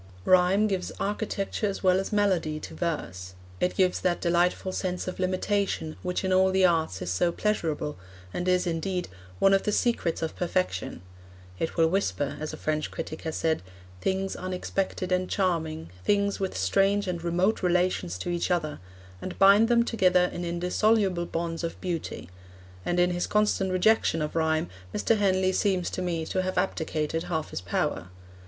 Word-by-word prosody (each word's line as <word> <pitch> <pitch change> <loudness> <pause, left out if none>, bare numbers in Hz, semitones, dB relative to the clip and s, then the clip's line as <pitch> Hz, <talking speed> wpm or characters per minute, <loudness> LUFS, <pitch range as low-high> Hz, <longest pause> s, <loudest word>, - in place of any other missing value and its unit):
Rhyme 185 +3 +5
gives 190 -3 -1
architecture 205 0 -2
as 200 - -4
well 185 0 +4
as 195 - -4
melody 185 -7 +1
to - - -8
verse; 95 - -4 0.2
it 180 - 0
gives 185 -1 +2
that 175 -1 +1
delightful 175 +2 +1
sense 185 -1 -3
of 185 - -5
limitation 185 -3 -1
which 180 +1 -2
in 190 - +1
all 190 0 +5
the 190 0 +4
arts 160 - +1
is 90 - -3
so 130 - +2
pleasurable, 160 - -1 0.3
and 175 - -3
is, 180 0 +3
indeed, 180 +2 -2 0.3
one 195 - +4
of 195 - +4
the 210 - -1
secrets 205 -8 0
of 160 - -3
perfection; 90 - -2 0.6
it 165 - -2
will 165 -1 +5
whisper, 160 -6 -1
as 155 0 -4
a - - -7
French 155 0 -1
critic 155 - -6
has 160 -1 -4
said, 160 -1 0 0.4
'things 190 0 -1
unexpected 185 0 -3
and 185 0 +1
charming, 160 - -1
things 200 - +1
with 190 -1 -2
strange 195 - +2
and 175 -2 -3
remote 180 +5 +1
relations 180 - +1
to 175 - -3
each 175 +1 -1
other,' 160 -4 -1 0.4
and 185 - -6
bind 200 +3 +7
them 235 0 +4
together 185 -6 +3
in 175 - -4
indissoluble 180 +1 +1
bonds 165 0 -3
of 165 - -4
beauty; 170 - -4 0.6
and 175 0 0
in 180 0 +4
his 175 0 -1
constant 210 -2 +1
rejection 185 -2 +3
of 150 0 -3
rhyme, 160 -1 +1 0.3
Mr. 225 - +2
Henley 190 -2 +2
seems 185 -2 0
to - - -3
me 170 -3 -2
to 185 - -1
have 185 0 -3
abdicated 165 -3 -1
half 160 -3 -3
his - - -4
power. 90 0 -2
180 Hz, 175 wpm, -27 LUFS, 165-190 Hz, 0.6 s, bind